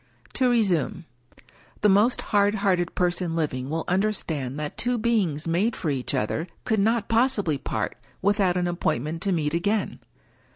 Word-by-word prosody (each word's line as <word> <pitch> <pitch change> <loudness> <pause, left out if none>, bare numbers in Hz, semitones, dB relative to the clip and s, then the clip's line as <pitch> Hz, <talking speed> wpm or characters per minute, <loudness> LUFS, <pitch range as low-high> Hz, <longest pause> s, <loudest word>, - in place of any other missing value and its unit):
To 255 -1 +2
resume. 180 - +1 0.8
The 210 - +5
most 210 +6 +4
hard 205 0 +4
hearted 185 -4 0
person 175 -1 0
living 135 -5 -2
will 160 +2 -2
understand 165 -9 -1
that 150 -1 -4
two 245 0 0
beings 200 -10 0
made 190 +8 +1
for 160 - -2
each 130 -3 -2
other 155 +10 -1 0.2
could 220 - +1
not 225 +2 +2
possibly 225 - +2
part - - -3 0.2
without 195 -3 +2
an 180 - 0
appointment 165 -3 -1
to 195 - 0
meet 155 -4 0
again. 205 +5 0
180 Hz, 155 wpm, -25 LUFS, 160-210 Hz, 0.8 s, The